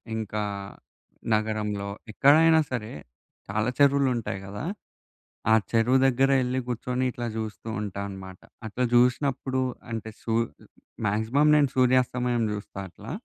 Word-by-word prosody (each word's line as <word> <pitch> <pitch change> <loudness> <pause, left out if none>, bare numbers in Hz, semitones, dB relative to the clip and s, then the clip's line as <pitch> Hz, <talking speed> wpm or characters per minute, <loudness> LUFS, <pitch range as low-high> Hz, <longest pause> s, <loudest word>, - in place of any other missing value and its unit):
ఇంకా 105 -1 -3 0.9
నగరంలో 105 -2 -1 0.2
ఎక్కడైనా 160 +7 +5
సరే 115 -3 -3 0.6
చాలా 110 +3 0
చెరువులుంటాయి 135 -7 +2
కదా! 100 +1 -6 0.9
ఆ - - +8 0.2
చెరువు 120 +3 +3
దగ్గరే 135 +1 +3
ఎళ్లి 125 +1 -1
కూర్చొని 125 +2 -2
ఇట్లా 120 -1 -5
జూస్తూ 110 0 -5
ఉంటాన్నమాట 95 -2 -6 0.3
అట్లా 120 +4 -2
జుసినప్పుడు 130 +2 +2 0.3
అంటే 110 -1 -4
సూ 115 - -1 0.7
మాక్సిమం 110 +9 +2
నేను 145 -2 +4
సూర్యాస్తమయం 125 -1 +2
చూస్తా 105 -1 -7
అట్లా. 105 +4 -11
120 Hz, 110 wpm, -26 LUFS, 105-130 Hz, 0.9 s, ఆ